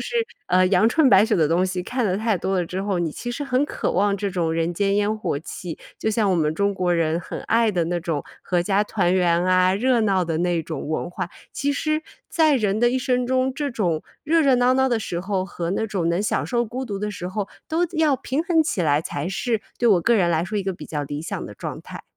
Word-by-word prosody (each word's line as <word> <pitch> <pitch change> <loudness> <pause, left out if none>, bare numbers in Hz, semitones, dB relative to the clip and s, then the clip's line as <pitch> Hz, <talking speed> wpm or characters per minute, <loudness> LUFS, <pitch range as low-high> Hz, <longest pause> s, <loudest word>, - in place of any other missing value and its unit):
是， - - -5 0.4
呃， 185 +1 +4
阳 190 +4 +4
春 305 +1 +4
白 200 -1 +6
雪 220 -3 +1
的 160 -3 +3
东 170 +4 +2
西 185 -1 -2
看 245 +1 -1
得 190 -2 +1
太 220 -2 +1
多 190 +2 -1
了 175 - -1
之 185 +3 -4
后， 195 -3 -1
你 165 -3 -1
其 240 - -5
实 285 +4 -4
很 270 +1 +1
渴 - - -2
望 200 +2 +2
这 200 +1 -2
种 170 -4 -1
人 165 +1 -1
间 200 +2 +1
烟 210 +1 +1
火 165 -8 -2
气， 165 +1 -7 0.2
就 220 - 0
像 210 -2 +1
我 185 - +3
们 155 -2 +1
中 200 +4 0
国 180 -2 0
人 165 0 +1
很 - - -7
爱 230 -1 +2
的 175 -4 0
那 175 +1 -2
种 160 -4 -3 0.2
阖 180 -1 +1
家 195 +3 +2
团 190 -4 0
圆 175 -1 +2
啊， 185 0 +4
热 240 +4 +2
闹 195 -4 +2
的 165 -1 -2
那 175 -1 +1
种 155 -2 -5
文 155 - -2
化。 175 -1 -5 0.2
其 285 +1 -1
实 310 +2 -1 0.3
在 310 -4 +3
人 210 -1 0
的 240 0 +4
一 260 - 0
生 250 -2 0
中， 260 +1 0
这 285 -1 -2
种 175 -9 -1 0.2
热 325 +2 +3
热 270 -3 +4
闹 250 +1 +3
闹 265 0 +3
的 235 -2 +1
时 175 -5 -4
候， 190 0 -1
和 175 -3 -4
那 220 +3 -1
种 185 -6 -1
能 170 +3 +1
享 210 - 0
受 240 -1 0
孤 255 +4 -5
独 200 -4 -4
的 210 +1 -2
时 180 -3 -5
候， 200 +1 -3 0.2
都 330 +2 +1
要 310 -4 +2
平 270 +5 -2
衡 330 -2 +2
起 200 - -1
来 145 -1 +3
才 155 +1 -4
是 225 +2 -1 0.2
对 240 - +3
我 190 -5 +5
个 230 +7 +3
人 175 -4 +3
来 165 0 +1
说 210 +2 -3
一 195 - -3
个 190 - -1
比 155 -4 -10
较 145 -2 -3
理 145 +2 -5
想 - - -5
的 - - -10
状 - - -6
态。 - - -10
195 Hz, 280 characters per minute, -23 LUFS, 175-240 Hz, 0.4 s, 白